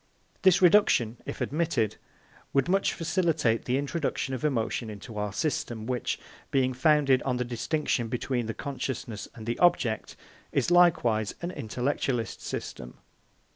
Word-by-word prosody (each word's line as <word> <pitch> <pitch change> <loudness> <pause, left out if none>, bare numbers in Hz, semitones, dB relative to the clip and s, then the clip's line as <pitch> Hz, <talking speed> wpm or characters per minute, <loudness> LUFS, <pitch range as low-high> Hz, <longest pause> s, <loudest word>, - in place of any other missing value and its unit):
This 190 -1 +5
reduction, 165 - +5
if - - -5
admitted, 140 -9 0 0.6
would 135 -1 +3
much 195 +2 +2
facilitate 165 - +1
the 125 +1 +1
introduction 140 -1 -2
of 130 - -4
emotion 115 -5 0
into 105 +2 -9
our 105 -1 -2
system, 120 -3 -2
which, 125 -1 -1 0.3
being 130 -1 +2
founded 135 -1 +4
on 125 -2 -1
the 125 - -1
distinction 120 +1 -1
between 125 0 -2
the 115 - -4
consciousness 130 -5 -4
and 110 - -9
the 120 +1 -2
object, 145 -11 +2 0.4
is - - +1
likewise 125 - +4
an 175 - -2
intellectualist 125 - -2
system. 60 0 -6
130 Hz, 135 wpm, -28 LUFS, 115-155 Hz, 0.6 s, This